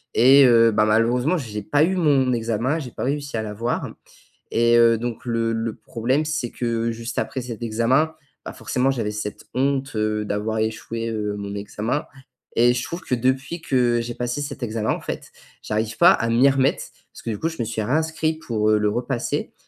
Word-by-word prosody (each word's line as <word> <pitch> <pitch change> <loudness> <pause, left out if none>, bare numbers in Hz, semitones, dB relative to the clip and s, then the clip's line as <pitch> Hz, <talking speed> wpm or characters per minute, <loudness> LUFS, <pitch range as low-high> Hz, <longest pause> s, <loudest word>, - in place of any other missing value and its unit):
et 135 +4 +7
heu, 115 -2 +6
ben 105 0 +3
malheureusement 120 +9 +2
j'ai 110 -8 -5
pas 145 +8 +2
eu 185 +4 +1
mon 140 -6 +3
examen, 115 +6 -1
j'ai 135 -5 -6
pas - - -6
réussi 140 -1 -2
à 110 - -2
l'avoir 110 +3 -3 0.6
et 120 0 +4
heu, 115 -1 +5
donc 120 +2 -5
le 115 -1 0
le 115 -1 -2
problème 130 +6 -1
c'est 155 -6 -2
que 115 -1 -1
juste 115 +1 -6
après - - -3
cet 120 -3 -7
examen, 125 +8 +1 0.3
bah - - -5
forcément 130 +2 -1
j'avais 115 -5 -2
cette 105 0 -6
honte, 135 +1 0
heu, 105 0 0
d'avoir 105 +2 -2
échoué, 115 +1 -3
heu, 105 -2 -2
mon 100 0 -5
examen 105 +7 -3 0.5
et 120 +1 +5
je 120 0 -2
trouve 170 +2 -5
que 125 - -1
depuis 130 +7 -1
que 120 -5 +2
j'ai 120 0 -5
passé 120 +3 -2
cet 140 -2 -5
examen, 110 -1 -2
en - - -2
fait, - - -6 0.3
j'arrive 110 +1 -2
pas, - - +8
à 115 - -1
m'y 120 +4 +5
remettre, 135 0 +1 0.3
parce - - -12
que - - -4
du 105 - -3
coup 165 - 0
je 165 - -9
me - - +1
suis 110 0 -3
réinscrit 155 +5 0
pour, 110 -7 0
heu, 110 - +4
le 105 0 +2
repasser, 120 +3 -2
120 Hz, 200 wpm, -22 LUFS, 110-135 Hz, 0.6 s, pas